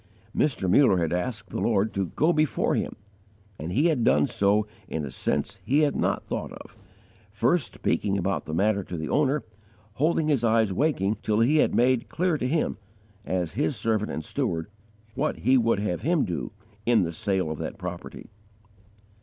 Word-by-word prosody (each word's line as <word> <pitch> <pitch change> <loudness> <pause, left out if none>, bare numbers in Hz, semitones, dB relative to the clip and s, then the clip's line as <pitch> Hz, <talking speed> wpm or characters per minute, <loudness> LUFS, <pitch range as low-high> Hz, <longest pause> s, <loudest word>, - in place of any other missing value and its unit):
Mr. 130 -10 +1
Muller 100 +1 +5
had 85 -1 0
asked 105 +6 -3
the - - -3
Lord 105 -2 +1
to 95 -2 -1
go 155 - +1
before 155 -2 +1
him, - - -2 0.6
and 80 +3 -5
He 140 - +2
had 155 -8 +2
done 75 -2 +4
so 105 +1 +2 0.2
in 75 -2 -3
a 65 - -7
sense 75 +11 -2
he 140 +8 +2
had 145 -2 +2
not - - 0
thought - - -4
of, - - -12 0.5
first 120 - 0
speaking 100 -1 0
about 95 +1 -1
the 80 - -6
matter 100 +2 +2
to 90 - -6
the 80 -1 -4
owner, 145 0 +1 0.6
holding 160 0 +2
his 140 -6 +2
eyes 110 -3 +3
waking 110 - +1
till 110 +1 +1
He 140 +7 +4
had - - +3
made 125 0 +2
clear 175 -3 0
to 125 - -1
him, 155 +4 0 0.5
as 90 -3 -1
His 145 +5 0
servant 110 -2 0
and 80 - -4
steward, 80 +4 -2 0.4
what - - -1
He 130 +4 +4
would 115 -4 +3
have 100 -4 -2
him 170 -2 +2
do 90 +3 -4 0.3
in 115 -4 +3
the 85 - -2
sale 95 -2 -1
of 80 - -5
that - - -5
property. - - -7
110 Hz, 185 wpm, -26 LUFS, 95-140 Hz, 0.6 s, Muller